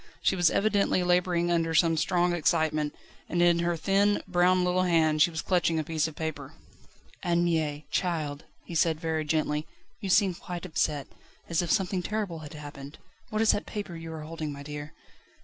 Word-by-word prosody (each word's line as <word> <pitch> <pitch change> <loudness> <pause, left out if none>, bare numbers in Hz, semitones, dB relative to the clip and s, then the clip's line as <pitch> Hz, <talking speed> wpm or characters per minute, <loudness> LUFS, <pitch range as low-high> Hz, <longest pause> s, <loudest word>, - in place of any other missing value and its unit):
She - - +3
was 175 -3 +4
evidently 200 -3 +2
labouring 175 -1 +2
under 165 -1 +1
some 165 +1 +4
strong 175 +2 +1
excitement, 155 -2 +1 0.3
and 175 - -1
in 175 -1 +4
her 170 0 0
thin, 200 +4 +2
brown 180 0 +3
little 180 +1 +2
hand 160 -4 +3
she 170 - +6
was 160 -2 -4
clutching 175 -3 +1
a 155 - 0
piece 160 0 0
of 160 - -9
paper. 150 -4 -5 0.7
"Anne 175 0 +1
Mie! 155 -3 -1
Child," 155 -5 -1 0.2
he - - -8
said 160 -1 +2
very 160 -1 -1
gently, 150 0 -1 0.3
"you 195 - -5
seem 195 0 +4
quite 175 0 -7
upset 150 -4 -1 0.4
as 170 0 +2
if 175 - -4
something 190 -2 +1
terrible 200 -3 -3
had 150 -1 -9
happened. 145 -1 -9 0.3
What 215 +1 0
is 220 - +6
that 205 - -2
paper 205 -5 -5
you 165 0 -7
are 160 - -6
holding, 155 -1 -5
my 140 0 -8
dear?" 150 +1 -7
165 Hz, 185 wpm, -28 LUFS, 155-180 Hz, 0.7 s, she